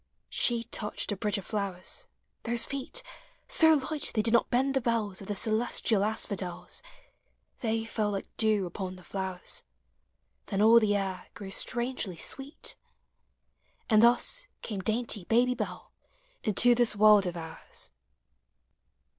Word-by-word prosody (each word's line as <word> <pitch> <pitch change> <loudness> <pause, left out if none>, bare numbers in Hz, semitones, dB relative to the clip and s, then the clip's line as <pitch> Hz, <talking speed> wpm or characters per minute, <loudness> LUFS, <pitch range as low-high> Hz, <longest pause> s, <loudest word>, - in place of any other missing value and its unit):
She 235 -1 +2
touched 210 -1 -3
a - - 0
bridge 205 +1 -1
of 195 - -7
Uowers— 200 - -2 0.3
those 235 0 +2
feet, 275 - -3 0.4
So 325 -11 +6 0.2
light 305 -2 +1
they 215 - +2
did 225 +1 +2
not 235 - +3
bend 265 +3 +1
the 270 - +1
bells 225 -5 -1
Of 195 - -9
the 205 - -2
celestial 220 -1 +2
asphodels, 200 -4 -3 0.8
They 225 -1 -1
fell 215 -2 -1
like 200 -1 -3
dew 215 -3 +2
upon 185 +1 -5
the 180 - -14
flowers: 190 -2 -3 0.9
Then 195 - -2
all 225 +2 +7
the 210 -2 +2
air 195 -2 -3
grew 195 -3 -8
strangely 240 -5 -2
sweet. 270 - -5 1.2
And 215 -1 +6
thus 245 - +3 0.2
came 210 -4 -4
dainty 220 -1 -1
Baby 245 +4 +3
Bell 225 -4 -6 0.5
Into 240 +2 +5
this 240 -2 +3
world 210 -2 +6
of 175 -1 -4
ours. 160 - -5
215 Hz, 140 wpm, -29 LUFS, 195-240 Hz, 1.2 s, all